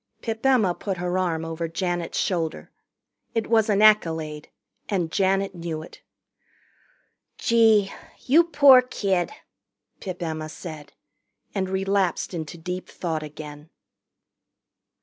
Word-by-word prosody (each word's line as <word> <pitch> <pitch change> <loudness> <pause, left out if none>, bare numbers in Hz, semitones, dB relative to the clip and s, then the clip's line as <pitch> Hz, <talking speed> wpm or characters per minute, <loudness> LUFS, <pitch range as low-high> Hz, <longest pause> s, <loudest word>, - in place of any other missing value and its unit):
Pip 225 -1 -4
Emma 245 -9 +3
put 190 +1 -4
her 180 +1 -1
arm 165 -3 -1
over 165 +1 -3
Janet's 175 0 -3
shoulder. 165 -4 -2 0.6
It 225 - 0
was 225 -1 +2
an 205 0 +3
accolade, 160 -8 +3 0.4
and 175 -6 -1
Janet 195 0 +1
knew 165 -3 -5
it. - - -14 1.4
"Gee 220 -4 +4 0.3
you 320 +6 +5
poor 280 -5 +7
kid!" 195 -8 -1 0.7
Pip 180 -2 -6
Emma 155 -1 -4
said, 155 -3 -9 0.6
and 190 -2 -2
relapsed 195 -1 0
into 165 -1 -5
deep 180 +2 -6
thought 160 -3 -3
again. 150 0 -9
180 Hz, 115 wpm, -24 LUFS, 165-210 Hz, 1.4 s, poor